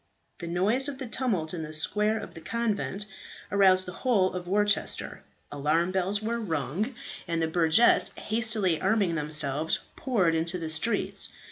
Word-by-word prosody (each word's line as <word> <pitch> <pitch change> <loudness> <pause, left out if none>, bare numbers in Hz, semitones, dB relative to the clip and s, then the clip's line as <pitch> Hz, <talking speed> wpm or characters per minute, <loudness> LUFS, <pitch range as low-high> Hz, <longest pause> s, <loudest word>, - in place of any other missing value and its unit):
The 170 - -6
noise 205 +10 +2
of 275 - -6
the 265 - -5
tumult 220 -10 -1
in 170 - -4
the 155 0 -6
square 210 +7 +1
of - - -8
the 165 - -10
convent 210 0 -2 0.5
aroused 190 -2 +4
the 180 - -6
whole 205 -8 +2
town 180 - -3
of 175 - -13
Worcester. 205 +2 0 0.3
Alarm 155 +5 +1
bells 190 +3 0
were 235 +2 -1
rung; 185 - -2 0.3
and 165 -1 -1
the 160 - +1
burgesses, 165 +7 +4
hastily 215 -6 +1
arming 205 -6 +2
themselves, 150 -1 0 0.2
poured 195 -11 +1
into 165 +2 -1
the 165 -2 -4
streets. 160 +9 -1
185 Hz, 160 wpm, -27 LUFS, 165-220 Hz, 0.5 s, aroused